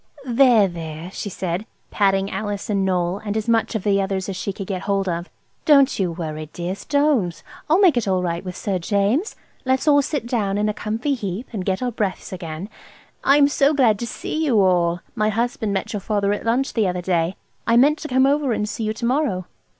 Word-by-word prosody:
"There, 240 Hz, -4 st, +5 dB
there," 165 Hz, 0 st, -7 dB
she 205 Hz, -, -5 dB
said, 185 Hz, +3 st, -3 dB, 0.2 s
patting 195 Hz, -1 st, +2 dB
Alice 205 Hz, -1 st, -3 dB
and 195 Hz, -2 st, +1 dB
Noël 180 Hz, +1 st, 0 dB
and 210 Hz, 0 st, -2 dB
as 220 Hz, -, -3 dB
much 230 Hz, 0 st, +1 dB
of 215 Hz, -, -2 dB
the 200 Hz, -1 st, +2 dB
others 190 Hz, -1 st, -2 dB
as 195 Hz, -, -4 dB
she 200 Hz, -, -3 dB
could 195 Hz, 0 st, -6 dB
get 185 Hz, -2 st, -3 dB
hold 195 Hz, -1 st, 0 dB
of. 175 Hz, 0 st, -3 dB, 0.3 s
"Don't 280 Hz, -5 st, +5 dB
you 185 Hz, -3 st, +1 dB
worry, 155 Hz, -2 st, -5 dB
dears, 180 Hz, +3 st, -5 dB
don't. 285 Hz, -, +1 dB, 0.3 s
I'll 325 Hz, -, +5 dB
make 365 Hz, -8 st, +5 dB
it 230 Hz, -, 0 dB
all 185 Hz, -1 st, +1 dB
right 170 Hz, 0 st, -2 dB
with 180 Hz, -2 st, -6 dB
Sir 195 Hz, -3 st, -2 dB
James. 205 Hz, -, 0 dB, 0.3 s
Let's 260 Hz, +2 st, 0 dB
all 285 Hz, -1 st, +6 dB
sit 290 Hz, -3 st, -3 dB
down 210 Hz, -5 st, -1 dB
in 210 Hz, +1 st, +1 dB
a 210 Hz, -, 0 dB
comfy 225 Hz, +8 st, -2 dB
heap, 210 Hz, -1 st, -4 dB
and 200 Hz, -4 st, -3 dB
get 190 Hz, +5 st, -1 dB
our 250 Hz, -, -1 dB
breaths 200 Hz, -4 st, -3 dB
again. 170 Hz, 0 st, -6 dB, 0.6 s
I 275 Hz, +1 st, +5 dB
am 285 Hz, -1 st, +6 dB
so 285 Hz, +1 st, +2 dB
glad 230 Hz, -7 st, +3 dB
to 235 Hz, -, -3 dB
see 315 Hz, +6 st, -3 dB
you 250 Hz, -9 st, +3 dB
all. 175 Hz, -2 st, +2 dB
My 215 Hz, -2 st, +1 dB
husband 225 Hz, -1 st, -1 dB
met 195 Hz, +2 st, -2 dB
your 210 Hz, -, -2 dB
father 205 Hz, 0 st, 0 dB
at 205 Hz, -, -5 dB
lunch 245 Hz, +4 st, +1 dB
the 220 Hz, -4 st, +2 dB
other 180 Hz, 0 st, -2 dB
day. 175 Hz, 0 st, 0 dB, 0.3 s
I 230 Hz, 0 st, +4 dB
meant 290 Hz, +5 st, +4 dB
to 310 Hz, -, -5 dB
come 260 Hz, -1 st, +3 dB
over 280 Hz, -2 st, +2 dB
and 210 Hz, -1 st, -1 dB
see 220 Hz, +1 st, -4 dB
you 215 Hz, -, -1 dB
to 235 Hz, -, -4 dB
morrow." 240 Hz, -, 0 dB
205 Hz, 225 wpm, -22 LUFS, 185-245 Hz, 0.6 s, all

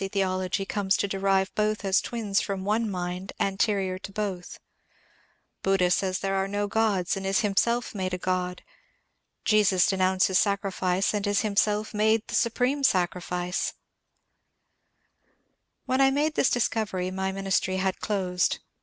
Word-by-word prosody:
theology 185 Hz, -1 st, -1 dB
comes 195 Hz, -1 st, 0 dB
to 200 Hz, -, 0 dB
derive 195 Hz, 0 st, +1 dB
both 215 Hz, -1 st, -1 dB
as 195 Hz, +1 st, +3 dB
twins 215 Hz, -4 st, -1 dB
from 195 Hz, -1 st, -4 dB
one 215 Hz, +2 st, +1 dB
mind 180 Hz, 0 st, -4 dB
anterior 195 Hz, -1 st, 0 dB
to 195 Hz, -, -9 dB
both; 195 Hz, -3 st, -4 dB, 1.0 s
Buddha 190 Hz, -2 st, +2 dB
says 185 Hz, 0 st, +1 dB
there 195 Hz, 0 st, -2 dB
are 195 Hz, 0 st, 0 dB
no 205 Hz, +1 st, -1 dB
gods, 205 Hz, -4 st, +1 dB
and 195 Hz, -, -5 dB
is 195 Hz, +2 st, +1 dB
himself 235 Hz, +4 st, +1 dB
made 185 Hz, -3 st, -3 dB
a 180 Hz, -, -2 dB
god; 180 Hz, 0 st, -2 dB, 0.8 s
Jesus 200 Hz, -4 st, +4 dB
denounces 185 Hz, -1 st, +2 dB
sacrifice, 195 Hz, -2 st, 0 dB
and 205 Hz, -1 st, -1 dB
is 205 Hz, 0 st, +2 dB
him 210 Hz, -2 st, -2 dB
self 210 Hz, +1 st, +1 dB
made 220 Hz, +1 st, +2 dB
the -, -, -8 dB
supreme 250 Hz, +5 st, +1 dB
sacrifice 180 Hz, -4 st, 0 dB
I -, -, -46 dB, 0.6 s
When 260 Hz, +1 st, +1 dB
I 270 Hz, -, +6 dB
made 295 Hz, +3 st, +1 dB
this 275 Hz, -, +2 dB
discovery 210 Hz, -6 st, -1 dB
my 190 Hz, 0 st, -2 dB
ministry 190 Hz, -1 st, 0 dB
had 190 Hz, 0 st, -1 dB
closed. 185 Hz, -4 st, 0 dB
195 Hz, 145 wpm, -26 LUFS, 185-210 Hz, 1.0 s, I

